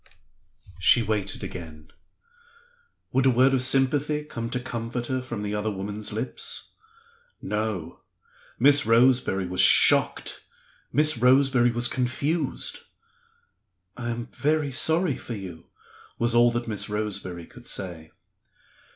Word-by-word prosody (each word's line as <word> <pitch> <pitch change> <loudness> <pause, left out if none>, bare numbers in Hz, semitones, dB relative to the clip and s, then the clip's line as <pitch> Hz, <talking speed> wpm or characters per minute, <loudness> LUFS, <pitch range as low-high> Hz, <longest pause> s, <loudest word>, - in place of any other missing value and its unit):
She 90 +7 +5
waited 105 -2 -3
again. 80 -3 -9 1.2
Would 130 +1 +2
a - - +6
word 130 +2 +3
of 130 - +2
sympathy 140 +3 +2
come 115 -6 -6
to 125 - -2
comfort 120 -1 -5
her 130 +1 -2
from 120 -5 -6
the 105 0 -3
other 105 +1 -2
woman's 105 +2 -5
lips? 115 +4 -4 0.7
No! 105 -5 -4 0.6
Miss 145 +3 +6
Roseberry 115 -5 +3
was 90 0 0
shocked; - - +4 0.5
Miss 150 0 +2
Roseberry 130 0 +4
was 120 0 0
confused. 140 +7 -2 1.2
"I 120 -1 -5
am 120 0 -4
very 150 -1 0
sorry 160 +4 +1
for 120 - -7
you," 90 -5 -9 0.5
was 120 0 0
all 120 0 +5
that 120 0 -3
Miss 105 -1 -3
Roseberry 100 -5 -4
could 120 +6 -16
say. 85 -5 -5
120 Hz, 125 wpm, -25 LUFS, 105-130 Hz, 1.2 s, a